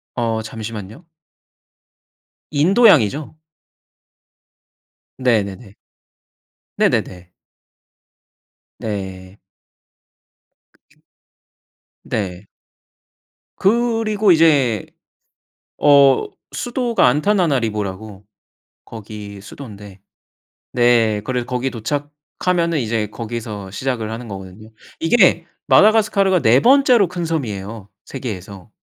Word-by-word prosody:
어 115 -2 -1
잠시만요. 110 - -8 1.5
인도양이죠. 155 - +3 1.8
네네네. 105 -4 -1 1.0
네네네. 90 -1 -1 1.5
네. 95 -2 -6 1.4
그쵸. - - -33 1.0
네. 95 -2 -4 1.1
그리고 220 -2 +2
이제 140 - +3 0.9
어 140 - +5 0.3
수도가 245 - 0
안타나나리보라고 115 - -1 0.6
거기 105 -2 -9
수도인데 100 -3 -11 0.7
네 115 -3 +3
그래서 125 -2 -2
거기 125 +1 -2
도착하면은 150 +7 -2
이제 110 -2 -1
거기서 110 -4 -6
시작을 115 -1 -3
하는 115 +1 -7
거거든요. 100 +2 -10 0.3
이게 170 -1 +3 0.2
마다가스카르가 200 +3 +4
4 120 +5 +4
번째로 250 - +4
큰 175 -1 -4
섬이에요 110 -9 -4 0.2
세계에서. 100 -8 -8
120 Hz, 185 characters per minute, -19 LUFS, 105-165 Hz, 1.8 s, 어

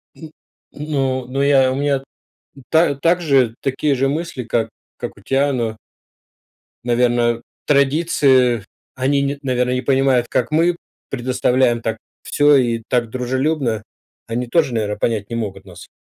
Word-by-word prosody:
Мгм. 160 -2 -11 0.4
Ну 135 -4 -2
ну 135 +2 -2
я 135 -2 +4
у - - -2
меня 140 -1 0 0.7
та 160 -3 +3
также 140 -6 +2
такие 135 +2 0
же 135 +1 +1
мысли, 155 -3 -3
как 115 0 -1 0.3
как - - -7
у - - -16
тебя, 140 +1 +1
но 115 -3 -2 1.1
наверно, 120 -1 +1 0.2
традиции, 140 - +3 0.3
они 135 +2 +1
не 140 0 -2
наверно, 125 -2 0
не 125 - -1
понимают 135 -2 +2
как 125 - -1
мы 165 +3 +3 0.3
предоставляем 125 -1 +1
так 115 0 -2 0.3
всё 145 0 +4
и 120 -3 +1
так 120 -2 0
дружелюбно. 130 -1 -1 0.4
Они 120 +2 -3
тоже, 145 -1 +1
наверно, 105 -2 -1
понять 110 -3 -1
не 115 - -4
могут 105 -4 -5
нас. - - -12
130 Hz, 140 wpm, -19 LUFS, 120-140 Hz, 1.1 s, я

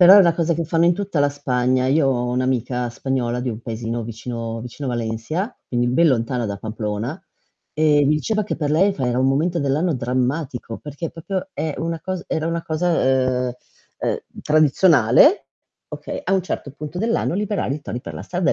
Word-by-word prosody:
Però 180 +1 +10
è 205 - +10
una 170 -4 +5
cosa 170 0 +1
che 165 0 -1
fanno 165 +1 +2
in 175 - +5
tutta 195 -5 -2
la 145 - +3
Spagna. 130 -2 +1
Io 140 +2 +3
ho 125 -2 0
un'amica 125 -1 -1
spagnola, 125 -1 -2
di 125 - -2
un 110 -1 -4
paesino 115 0 -3
vicino 115 0 -5
vicino 125 +4 -7
a - - -1
Valencia, 120 - -3
quindi 120 -1 0
ben 160 +7 +4
lontana 125 -1 0
da 100 -2 -3
Pamplona, 110 - -4 0.5
e 150 -1 +3
mi 150 - +4
diceva 215 +7 0
che 210 - -3
per 150 -3 -1
lei 190 +6 +4
fa 130 -8 -2
era 125 0 0
un 130 - +3
momento 160 +6 +1
dell'anno 150 +4 +1
drammatico, 125 0 -2
perché 150 +3 -5
proprio 190 - -4
è 155 -1 -2
una 165 0 -2
cos 185 -1 -3
era 160 0 -1
una 165 0 -1
cosa, 130 -7 +1
ehm, - - -4 0.4
ehm, - - -1 0.2
tradizionale, 155 - +5 0.4
okay. - - -6
A 195 - +2
un 190 - +2
certo 145 -5 -4
punto 150 +4 -7
dell'anno 230 -2 0
liberare 205 -6 -1
i 150 - -6
tori 120 -1 -6
per - - -7
la - - -7
strada, 180 -1 0
140 Hz, 200 wpm, -21 LUFS, 125-165 Hz, 0.5 s, Però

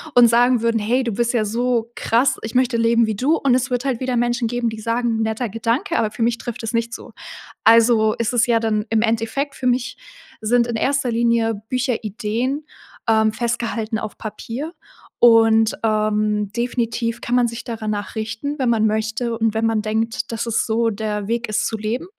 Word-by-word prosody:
und 245 -1 +8
sagen 240 0 +4
würden: 230 -1 +1
„Hey, 245 +5 +1
du 235 - -2
bist 235 +3 0
ja 225 -3 +1
so 235 +1 -1
krass, 235 +4 +2
ich 220 - -7
möchte 255 -1 +2
leben 230 0 +3
wie 220 -1 -2
du.“ 275 +10 +2
Und 270 -3 +2
es 255 +2 +1
wird 250 +1 -2
halt 255 -4 -1
wieder 255 -1 -1
Menschen 240 0 0
geben, 240 0 -1
die 220 -1 -7
sagen:„ 230 0 -1
Netter 220 +1 -1
Gedanke, 230 - -1
aber 220 - +1
für 230 - -3
mich 235 0 +1
trifft 240 -1 -6
es 225 +1 -4
nicht 230 0 0
zu.“ - - -9 0.5
Also 225 -1 +5
ist 230 +1 -2
es 235 -1 +3
ja 235 -1 +3
dann 215 -1 0
im 225 -1 +2
Endeffekt 230 +5 -1
für 255 - -2
mich 250 +1 0 0.4
sind 235 +2 +2
in 235 - -3
1. 265 +1 0
Linie 230 -1 +1
Bücher 250 -2 -1
Ideen, 235 +7 -2 0.4
ähm, 220 -1 +4
festgehalten 235 -2 -2
auf 215 - -7
Papier. 230 - -6 0.5
Und, 225 -1 +5
ähm, 215 -1 0
definitiv 235 -1 -2
kann 240 - -3
man 245 -1 +3
sich 230 0 -6
dara 225 -3 -6
nach 205 -2 -3
richten, 225 +7 -4
wenn 255 -2 +1
man 220 -2 +2
möchte 220 +2 -1
und 225 -1 0
wenn 220 +1 +1
man 225 -1 +1
denkt, 220 +3 -2
dass 225 0 -3
es 230 -1 0
so 225 0 +1
der 210 -1 -3
Weg 235 +1 -1
ist 210 - 0
zu 225 - -2
leben 220 +7 -3
230 Hz, 205 wpm, -20 LUFS, 220-245 Hz, 0.5 s, und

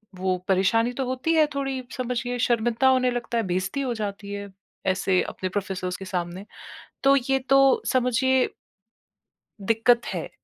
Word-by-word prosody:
वो 185 0 -1
परेशानी 210 +5 +2
तो 265 +1 -2
होती 260 +6 -1
है 315 -1 +5
थोड़ी 270 -2 -2
समझिए 245 0 -2
शर्मिंदा 240 +1 +2
होने 255 -1 +3
लगता 240 -1 -3
है, 230 - +1
बेइज्ज़ती 185 +10 -1
हो 255 -3 -1
जाती 205 -2 -5
है 200 0 -6 0.4
ऐसे 185 0 +2
अपने 185 - -4
प्रोफ़ेसर्स 185 -2 -3
के 195 - -8
सामने। 180 +1 -4 0.6
तो 275 0 +6 0.2
ये 270 - +4
तो 275 0 +7 0.3
समझिए 255 +1 +2 1.1
दिक्कत 225 +3 +3
है। - - -4
235 Hz, 150 wpm, -25 LUFS, 190-255 Hz, 1.1 s, तो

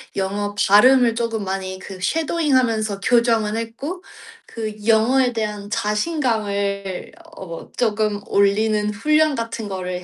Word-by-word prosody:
영어 205 +1 -2
발음을 240 +4 +6
쪼금 230 -2 -2
많이 190 0 -4
그 190 -1 -9
쉐도잉하면서 255 - +1
교정을 230 -2 +2
했고 275 +11 -5 0.4
그 220 -2 -5
영어에 245 +3 +3
대한 210 -2 -4
자신감을 210 - -2 0.3
어 170 -3 -9
쪼금 215 -3 0
올리는 210 +1 +2
훈련 305 +7 +2
같은 230 -2 -4
거를 180 -1 -4
215 Hz, 255 characters per minute, -21 LUFS, 200-240 Hz, 0.4 s, 발음을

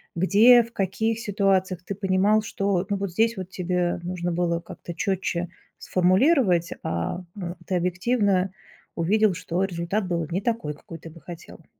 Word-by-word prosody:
где, 220 +7 +6
в 230 - -13
каких 220 +3 -1
ситуациях 195 -4 0
ты 200 - -4
понимал, 200 +2 +2
что, 195 -3 -1
ну, 200 - +1
вот 195 -1 -3
здесь, 225 +5 +2
вот, 185 -1 -6
тебе 180 -1 -1
нужно 175 0 -3
было 170 0 0
как-то 170 - -9
чётче 180 -3 -1 0.3
сформулировать, 185 - +3
а, 85 - -3
э, 175 -2 -5
ты 185 - 0
объективно 185 +1 +1 0.4
увидел, 205 +4 +2
что 180 0 -3
результат 185 +3 -2
был 170 -2 -1
не 180 - 0
такой, 205 -9 -2
какой 165 +2 -11
ты 165 - -10
бы 165 +1 -14
хотел. 170 0 -11
185 Hz, 160 wpm, -25 LUFS, 175-205 Hz, 0.4 s, где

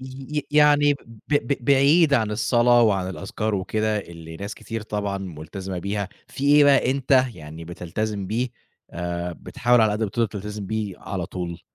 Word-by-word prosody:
ي 130 +3 -6
ي - - -1
يعني 145 -1 +5
ب - - -12 0.3
ب 140 -3 0
بعيد 140 +4 +5
عن 110 -5 +2
الصلاة 120 +2 +4
وعن 95 -5 +2
الأذْكار 105 +3 -3
وكده 110 +3 0
اللي 85 -4 -9
ناس 100 +4 -6
كتير 115 -1 -6
طبعًا 100 -2 -3
ملتزمة 90 +1 -6
بيها، 100 +1 -3 0.2
فيه 140 +1 +2
إيه 145 - +7
بقى 140 -3 +4
أنت 130 -1 +3
يعني 80 0 -9
بتلتزم 95 +4 -4
بيه 120 +6 -1 0.4
آآ 85 0 -4
بتحاول 120 +8 +1
على 110 -1 +4
قد 105 +2 -2
ما 110 - 0
تقدر 115 +2 +1
تلتزم 105 0 -6
بيه، 110 -2 -3
على 90 -4 -4
طول؟ 85 -2 -5
105 Hz, 175 wpm, -23 LUFS, 95-130 Hz, 0.4 s, إيه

